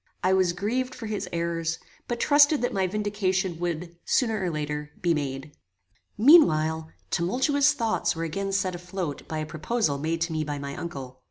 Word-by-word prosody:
I 185 Hz, +1 st, +3 dB
was 185 Hz, -2 st, +3 dB
grieved 250 Hz, +8 st, -2 dB
for 230 Hz, -, -7 dB
his 205 Hz, -4 st, -3 dB
errors, 170 Hz, -1 st, -1 dB, 0.3 s
but 240 Hz, -1 st, -3 dB
trusted 290 Hz, -1 st, +5 dB
that 245 Hz, -, 0 dB
my 190 Hz, -2 st, +1 dB
vindication 190 Hz, -3 st, -1 dB
would, 170 Hz, 0 st, -3 dB
sooner 225 Hz, -5 st, +1 dB
or 180 Hz, -, 0 dB
later, 150 Hz, -1 st, -3 dB
be 175 Hz, -2 st, +2 dB
made. 140 Hz, -1 st, -3 dB, 0.7 s
Meanwhile, 160 Hz, -, +5 dB, 0.2 s
tumultuous 275 Hz, -, +2 dB
thoughts 225 Hz, -, 0 dB
were 165 Hz, -, -3 dB
again 195 Hz, +5 st, -3 dB
set 190 Hz, -1 st, 0 dB
afloat 180 Hz, -3 st, -5 dB
by 160 Hz, -, -4 dB
a 155 Hz, -, -2 dB
proposal 155 Hz, -1 st, -1 dB
made 160 Hz, +2 st, -2 dB
to 165 Hz, 0 st, 0 dB
me 155 Hz, -1 st, 0 dB
by 145 Hz, -1 st, -4 dB
my 140 Hz, 0 st, -5 dB
uncle. 135 Hz, -6 st, -7 dB
175 Hz, 175 wpm, -26 LUFS, 160-210 Hz, 0.7 s, trusted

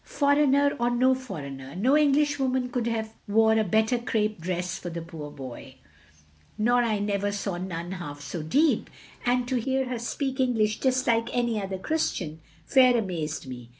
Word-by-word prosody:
"Foreigner 285 Hz, -1 st, +3 dB
or 240 Hz, 0 st, +2 dB
no 255 Hz, +2 st, +3 dB
foreigner, 140 Hz, -, -7 dB
no 250 Hz, +10 st, +3 dB
Englishwoman 280 Hz, -3 st, +2 dB
could 245 Hz, -2 st, -2 dB
have 220 Hz, -1 st, -2 dB
wore 220 Hz, +2 st, +4 dB
a 220 Hz, 0 st, +3 dB
better 220 Hz, +5 st, +2 dB
crape 215 Hz, -5 st, -1 dB
dress 180 Hz, +1 st, -2 dB
for 175 Hz, -, -6 dB
the 170 Hz, 0 st, -5 dB
poor 165 Hz, -3 st, -8 dB
boy; 130 Hz, -4 st, -9 dB, 0.8 s
nor 245 Hz, +3 st, +3 dB
I 225 Hz, -3 st, +1 dB
never 205 Hz, 0 st, -1 dB
saw 200 Hz, -3 st, -3 dB
none 175 Hz, -1 st, -5 dB
half 150 Hz, -6 st, -6 dB
so 160 Hz, +3 st, -5 dB
deep; 285 Hz, -, +2 dB, 0.4 s
and 245 Hz, 0 st, +2 dB
to 255 Hz, 0 st, 0 dB
hear 265 Hz, +2 st, 0 dB
her 245 Hz, -2 st, -3 dB
speak 265 Hz, +3 st, -3 dB
English 225 Hz, -4 st, +1 dB
just 260 Hz, -1 st, +1 dB
like 230 Hz, 0 st, +2 dB
any 235 Hz, -3 st, +1 dB
other 195 Hz, -1 st, -4 dB
Christian, 180 Hz, -, -2 dB, 0.2 s
fair 255 Hz, -2 st, +5 dB
amazed 160 Hz, -9 st, -3 dB
me. 125 Hz, -2 st, -9 dB
220 Hz, 170 wpm, -26 LUFS, 180-255 Hz, 0.8 s, fair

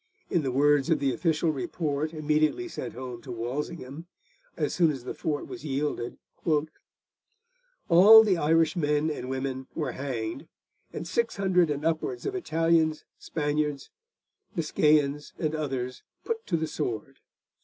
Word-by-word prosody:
In 175 Hz, -, +2 dB
the 135 Hz, -3 st, -1 dB
words 145 Hz, +2 st, +3 dB
of 165 Hz, -, +4 dB
the 135 Hz, -2 st, 0 dB
official 160 Hz, +5 st, +1 dB
report 155 Hz, 0 st, -2 dB
immediately 155 Hz, -, +1 dB
sent -, -, -6 dB
home 125 Hz, -2 st, -7 dB
to 130 Hz, -, -9 dB
Walsingham, 140 Hz, +6 st, -5 dB, 0.5 s
as 150 Hz, -3 st, -1 dB
soon 170 Hz, -3 st, +4 dB
as 135 Hz, -5 st, -4 dB
the 125 Hz, -, -5 dB
fort 150 Hz, -2 st, -2 dB
was -, -, -9 dB
yielded, 140 Hz, -4 st, -2 dB, 1.7 s
'all 205 Hz, +6 st, +9 dB
the 205 Hz, -4 st, +3 dB
Irish 165 Hz, +2 st, +2 dB
men 150 Hz, -1 st, +1 dB
and 130 Hz, -4 st, -5 dB
women 130 Hz, 0 st, -3 dB
were 155 Hz, -, -2 dB
hanged, 120 Hz, -5 st, -4 dB, 0.4 s
and 165 Hz, -, -6 dB
600 190 Hz, -5 st, +1 dB
and 145 Hz, +1 st, -2 dB
upwards 165 Hz, -, -1 dB
of 400 Hz, -, -1 dB
Italians, 165 Hz, -, +1 dB
Spaniards, 150 Hz, -2 st, -2 dB, 0.6 s
Biscayans 150 Hz, -2 st, +2 dB
and 155 Hz, -2 st, -1 dB
others 130 Hz, -5 st, -3 dB, 0.2 s
put 455 Hz, -1 st, -4 dB
to 170 Hz, -, +1 dB
the 160 Hz, -, -1 dB
sword. 135 Hz, -4 st, -4 dB
150 Hz, 140 wpm, -27 LUFS, 135-165 Hz, 1.7 s, all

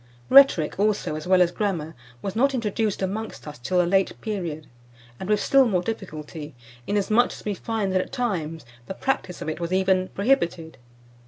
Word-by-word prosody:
Rhetoric, 265 Hz, -, +6 dB
also, 205 Hz, -6 st, +1 dB
as 155 Hz, +2 st, -6 dB
well 185 Hz, -1 st, +6 dB
as 175 Hz, -, -1 dB
Grammar, 175 Hz, -5 st, -2 dB, 0.3 s
was 195 Hz, 0 st, -4 dB
not 270 Hz, +4 st, +2 dB
introduced 215 Hz, -3 st, -1 dB
amongst 210 Hz, -1 st, -4 dB
us 150 Hz, -2 st, -8 dB
till 180 Hz, +9 st, 0 dB
a 175 Hz, -, +4 dB
late 190 Hz, +2 st, +1 dB
period, 170 Hz, -8 st, -4 dB, 0.5 s
and 190 Hz, -, -6 dB
with 210 Hz, -1 st, +3 dB
still 270 Hz, +2 st, +4 dB
more 185 Hz, -5 st, 0 dB
difficulty, 155 Hz, -, -6 dB, 0.3 s
inasmuch 210 Hz, +4 st, +2 dB
as -, -, -12 dB
we 210 Hz, -, -1 dB
find 205 Hz, -1 st, -2 dB
that, 185 Hz, -, +3 dB
at -, -, -8 dB
times, 165 Hz, -, -3 dB, 0.2 s
the 190 Hz, -, -5 dB
practice 225 Hz, -9 st, -2 dB
of -, -, -8 dB
it 155 Hz, -, -4 dB
was 170 Hz, 0 st, -3 dB
even 185 Hz, 0 st, +2 dB
prohibited. 185 Hz, -, 0 dB
190 Hz, 180 wpm, -24 LUFS, 170-215 Hz, 0.5 s, Rhetoric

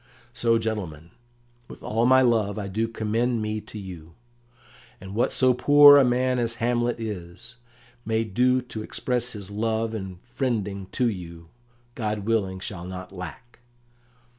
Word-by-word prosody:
"So, 115 Hz, -2 st, +2 dB
gentlemen, 90 Hz, -8 st, -4 dB, 0.6 s
with -, -, -12 dB
all 115 Hz, +2 st, +1 dB
my 130 Hz, 0 st, +6 dB
love 110 Hz, -4 st, +1 dB
I 100 Hz, -2 st, -4 dB
do 110 Hz, +4 st, -1 dB
commend 115 Hz, +2 st, -1 dB
me 110 Hz, 0 st, -3 dB
to 110 Hz, -, -11 dB
you; 85 Hz, -5 st, -9 dB, 0.8 s
and 95 Hz, +1 st, -9 dB
what 115 Hz, -, +1 dB
so 130 Hz, -1 st, +3 dB
poor 145 Hz, +3 st, +8 dB
a 140 Hz, -, +6 dB
man 125 Hz, 0 st, +1 dB
as 115 Hz, -1 st, 0 dB
Hamlet 120 Hz, 0 st, 0 dB
is, 105 Hz, +2 st, -7 dB, 0.5 s
may 110 Hz, 0 st, 0 dB
do 125 Hz, +4 st, +2 dB
to 120 Hz, -3 st, -7 dB
express 125 Hz, +2 st, -2 dB
his 100 Hz, -2 st, -8 dB
love 110 Hz, +1 st, -1 dB
and 95 Hz, -4 st, -6 dB, 0.2 s
friending 105 Hz, -7 st, -2 dB
to 125 Hz, -, +1 dB
you, 85 Hz, -5 st, -6 dB, 0.4 s
God 105 Hz, -4 st, -3 dB
willing, 100 Hz, -4 st, 0 dB
shall 95 Hz, -2 st, -7 dB
not 90 Hz, 0 st, -8 dB
lack. 95 Hz, +6 st, -9 dB
110 Hz, 150 wpm, -25 LUFS, 95-120 Hz, 0.8 s, poor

